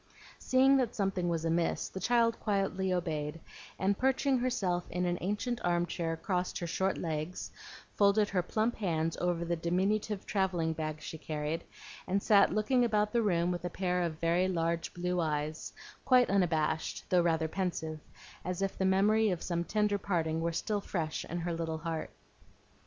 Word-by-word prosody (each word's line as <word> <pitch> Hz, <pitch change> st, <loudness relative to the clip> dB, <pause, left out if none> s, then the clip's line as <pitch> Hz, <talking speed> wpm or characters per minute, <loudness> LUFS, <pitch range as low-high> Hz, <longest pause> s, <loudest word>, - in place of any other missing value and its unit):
Seeing 265 Hz, +1 st, +4 dB
that 245 Hz, -3 st, 0 dB
something 195 Hz, -3 st, 0 dB
was 165 Hz, -1 st, -1 dB
amiss, 165 Hz, +1 st, 0 dB
the 190 Hz, -, -7 dB
child 230 Hz, +1 st, +2 dB
quietly 195 Hz, -2 st, 0 dB
obeyed, 160 Hz, -3 st, -2 dB, 0.4 s
and 195 Hz, +1 st, +1 dB
perching 265 Hz, +2 st, +2 dB
herself 190 Hz, -8 st, -1 dB
in 180 Hz, +1 st, -1 dB
an 175 Hz, 0 st, 0 dB
ancient 210 Hz, +6 st, -2 dB
arm 175 Hz, 0 st, +2 dB
chair 165 Hz, -2 st, -3 dB
crossed 180 Hz, +2 st, -2 dB
her 175 Hz, -, -3 dB
short 190 Hz, +3 st, 0 dB
legs, 160 Hz, +1 st, -4 dB, 0.5 s
folded 205 Hz, +1 st, +4 dB
her 185 Hz, -2 st, +1 dB
plump 220 Hz, +6 st, -1 dB
hands 165 Hz, -5 st, 0 dB
over 175 Hz, -1 st, 0 dB
the 170 Hz, 0 st, 0 dB
diminutive 190 Hz, +5 st, 0 dB
travelling 180 Hz, -5 st, 0 dB
bag 155 Hz, -1 st, -4 dB
she 160 Hz, -, -7 dB
carried, 150 Hz, +1 st, -3 dB, 0.4 s
and 195 Hz, +2 st, 0 dB
sat 205 Hz, -2 st, +5 dB
looking 215 Hz, +5 st, +2 dB
about 210 Hz, -2 st, +1 dB
the 235 Hz, -, +3 dB
room 175 Hz, -4 st, +2 dB
with 175 Hz, -1 st, -4 dB
a 175 Hz, -, -2 dB
pair 180 Hz, 0 st, -1 dB
of 165 Hz, -2 st, -2 dB
very 170 Hz, +2 st, +2 dB
large 170 Hz, -2 st, -1 dB
blue 180 Hz, 0 st, -1 dB
eyes, 155 Hz, -1 st, -2 dB, 0.3 s
quite 250 Hz, -4 st, +4 dB
unabashed, 160 Hz, -5 st, 0 dB
though 180 Hz, -1 st, +4 dB
rather 165 Hz, -2 st, +1 dB
pensive, 160 Hz, -3 st, -3 dB, 0.4 s
as 180 Hz, +2 st, -2 dB
if 195 Hz, -, -1 dB
the 190 Hz, -, +2 dB
memory 210 Hz, +3 st, +4 dB
of 180 Hz, -3 st, -2 dB
some 170 Hz, -1 st, -1 dB
tender 210 Hz, +1 st, +1 dB
parting 165 Hz, -4 st, -1 dB
were 170 Hz, +1 st, 0 dB
still 205 Hz, +5 st, -1 dB
fresh 160 Hz, -5 st, -3 dB
in 175 Hz, -, -4 dB
her 170 Hz, 0 st, -2 dB
little 165 Hz, -1 st, -2 dB
heart. 160 Hz, 0 st, -4 dB
180 Hz, 175 wpm, -31 LUFS, 165-200 Hz, 0.5 s, sat